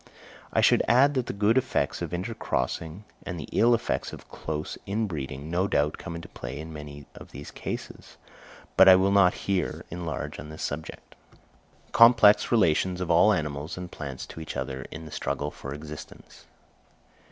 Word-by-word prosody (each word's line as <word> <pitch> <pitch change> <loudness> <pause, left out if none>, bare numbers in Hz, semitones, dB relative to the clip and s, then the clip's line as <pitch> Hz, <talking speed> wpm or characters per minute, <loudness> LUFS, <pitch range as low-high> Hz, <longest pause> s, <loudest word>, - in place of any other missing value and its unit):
I - - +2
should - - +5
add 135 +4 +5
that 130 -3 -1
the - - -2
good 105 +5 +3
effects 130 - -1
of - - -3
intercrossing, 90 - -3 0.2
and 90 -3 -5
the 75 - -6
ill 120 +1 +4
effects 115 - -2
of - - -11
close 75 -1 -5
interbreeding, 80 -9 -3
no 90 +3 +1
doubt 75 -4 0
come 85 -2 -6
into 85 - -7
play - - -7
in 80 +1 -8
many 75 -1 -9
of - - -12
these - - -9
cases; - - -7 0.6
but 95 - +8
I 95 - +10
will 95 +1 +3
not 100 -3 +5
here 95 -4 -1
enlarge 85 -1 -5
on 75 +3 -8
this 80 - -7
subject. 80 +2 -6 0.8
_Complex 115 -3 +7
Relations 95 -4 +2
of 90 -2 -1
all 85 +6 +6
Animals 75 -3 -2
and 90 -1 -7
Plants 70 -3 -6
to - - -10
each 80 - -6
other 65 0 -4
in 80 +1 -8
the 75 - -10
Struggle 75 +1 -3
for 70 - -8
Existence. 75 +1 -10
85 Hz, 175 wpm, -27 LUFS, 75-100 Hz, 0.8 s, I